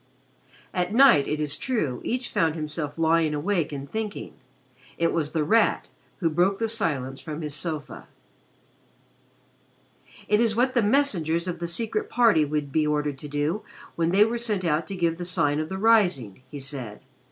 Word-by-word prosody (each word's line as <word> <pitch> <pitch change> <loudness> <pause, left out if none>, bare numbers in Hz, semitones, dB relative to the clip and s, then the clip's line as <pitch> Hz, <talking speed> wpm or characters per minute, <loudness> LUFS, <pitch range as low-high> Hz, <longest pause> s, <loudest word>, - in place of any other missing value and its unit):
At 180 +3 -1
night, 255 - +6
it 150 - -2
is 150 -1 -1
true, 155 - -2
each 250 +1 -2
found 160 -1 +1
himself 150 -1 -3
lying 160 -1 +2
awake 170 +1 -1
and 140 -1 -6
thinking. 215 +5 -5 0.6
It 165 0 +1
was 155 -3 -1
The 160 -2 0
Rat 225 +9 +2 0.3
who 165 - +2
broke 180 +5 +2
the 225 - -1
silence 140 - -2
from 155 0 -6
his 150 -1 -4
sofa. 155 0 -5 2.2
"It 210 +1 +3
is 225 -2 +2
what 255 +2 +2
the 240 - +3
messengers 185 - +1
of 175 -1 -4
the 170 - -3
Secret 235 - -1
Party 225 -10 +4
would 150 -1 -2
be 155 +1 +1
ordered 150 -2 -1
to 150 - -7
do 145 +7 -1 0.3
when 165 0 +1
they 200 +4 +5
were 235 +2 -2
sent 210 -6 -1
out 155 0 0
to 195 - -5
give 170 -2 0
the - - -3
Sign 150 -4 +1
for 155 - -1
the 190 +4 -5
Rising," 185 - +2
he 145 - -7
said. 130 -6 -6
165 Hz, 175 wpm, -25 LUFS, 150-210 Hz, 2.2 s, night